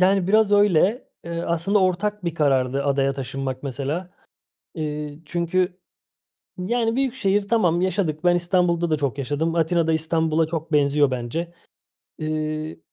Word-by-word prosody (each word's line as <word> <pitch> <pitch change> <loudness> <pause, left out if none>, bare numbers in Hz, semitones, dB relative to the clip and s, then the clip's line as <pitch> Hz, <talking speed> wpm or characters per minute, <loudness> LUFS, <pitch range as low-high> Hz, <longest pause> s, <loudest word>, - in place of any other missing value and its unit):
Yani, 190 0 +3
biraz 215 0 +4
öyle. 205 - +3 0.2
Eee, 170 0 -4
aslında 170 +5 +1
ortak 190 +2 0
bir 170 -1 -2
karardı 135 -2 +1
adaya 135 -1 +1
taşınmak 135 0 -4
mesela. 145 +6 -4 0.7
Eee, 150 -2 -4
çünkü, 180 +3 -1 0.8
yani, 225 +5 0
büyük 265 -2 0
şehir 200 -5 0
tamam, 180 -6 +2
yaşadık. 180 -4 -1
Ben 175 0 +4
İstanbul'da 175 -1 +1
da 155 - +1
çok 140 -2 -2
yaşadım. 145 +5 -1
Atina 165 0 +2
da 160 - +2
İstanbul'a 160 0 +1
çok 160 0 -5
benziyor 145 -1 +3
bence. 145 +8 -4 0.7
Eee, 155 0 -3
165 Hz, 140 wpm, -23 LUFS, 150-185 Hz, 0.8 s, biraz